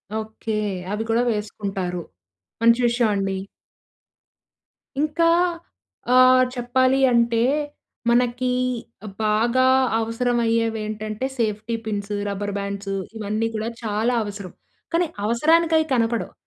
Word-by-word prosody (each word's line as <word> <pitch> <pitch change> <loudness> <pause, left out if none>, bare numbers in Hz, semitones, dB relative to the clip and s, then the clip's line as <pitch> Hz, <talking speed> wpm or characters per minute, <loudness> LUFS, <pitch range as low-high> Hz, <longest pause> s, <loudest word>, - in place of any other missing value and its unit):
Okay. 220 0 -4 0.4
అవి 210 +2 -2
కూడా 230 +2 +3
వేసుకుంటారు. 195 -4 -3 0.6
మంచి 230 +1 +5
విషయం 235 -2 +2
అండి. 195 -1 -1 1.6
ఇంకా 310 +2 +1 0.9
ఆహ్, 255 0 +7
చెప్పాలి 255 +2 +2
అంటే 235 -1 +3 0.7
మనకీ 245 +1 +2 0.7
బాగా 235 +4 +2 0.3
అవసరమయ్యేవి 230 -1 0
ఏంటంటే 215 +2 -4
సేఫ్టీ 220 0 -1
పిన్స్, 205 -1 -3
రబ్బర్ 205 0 -3
బాండ్స్ 200 0 -4 0.2
ఇవన్నీ 215 +1 -1
కూడా 220 +1 -2
చాలా 220 +3 0
అవసరం. 200 -3 -7 0.4
కానీ 340 +1 +2 0.2
అవసరానికయి 320 +7 +3
కనపడవు. 230 -1 0
225 Hz, 95 wpm, -23 LUFS, 210-245 Hz, 1.6 s, ఆహ్